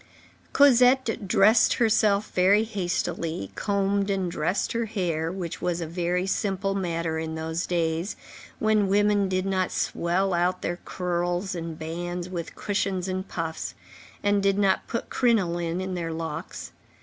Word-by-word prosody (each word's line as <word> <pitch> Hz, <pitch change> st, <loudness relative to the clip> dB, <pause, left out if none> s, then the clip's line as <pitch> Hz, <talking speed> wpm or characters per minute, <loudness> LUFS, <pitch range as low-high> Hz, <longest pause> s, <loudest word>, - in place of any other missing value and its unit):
Cosette 250 Hz, -5 st, +4 dB
dressed 215 Hz, +3 st, +5 dB
herself 215 Hz, -3 st, +2 dB
very 195 Hz, +4 st, +4 dB
hastily, 175 Hz, -, -3 dB
combed 200 Hz, 0 st, 0 dB
and 190 Hz, -3 st, -1 dB
dressed 175 Hz, +4 st, -1 dB
her 235 Hz, 0 st, -1 dB
hair, 170 Hz, -7 st, -2 dB
which 180 Hz, -3 st, -5 dB
was 175 Hz, -1 st, -1 dB
a 170 Hz, -, -3 dB
very 175 Hz, +2 st, -1 dB
simple 195 Hz, 0 st, -1 dB
matter 170 Hz, -4 st, -2 dB
in 160 Hz, 0 st, -4 dB
those 160 Hz, +2 st, -3 dB
days, 170 Hz, +1 st, -1 dB, 0.4 s
when 215 Hz, -2 st, +2 dB
women 205 Hz, 0 st, +3 dB
did 185 Hz, 0 st, 0 dB
not 190 Hz, -1 st, 0 dB
swell 185 Hz, +3 st, 0 dB
out 180 Hz, +1 st, 0 dB
their 175 Hz, -, -2 dB
curls 175 Hz, +1 st, -2 dB
and 165 Hz, -2 st, -5 dB
bands 175 Hz, +2 st, -4 dB
with 170 Hz, -3 st, -5 dB
cushions 195 Hz, -2 st, -1 dB
and 185 Hz, +1 st, -3 dB
puffs, 165 Hz, -1 st, -4 dB, 0.5 s
and 205 Hz, 0 st, +3 dB
did 195 Hz, 0 st, +2 dB
not 195 Hz, -2 st, +2 dB
put 235 Hz, -, -4 dB
crinoline 175 Hz, -8 st, +1 dB
in 185 Hz, 0 st, -3 dB
their 170 Hz, -2 st, -3 dB
locks. 160 Hz, 0 st, -5 dB
185 Hz, 145 wpm, -26 LUFS, 170-200 Hz, 0.5 s, dressed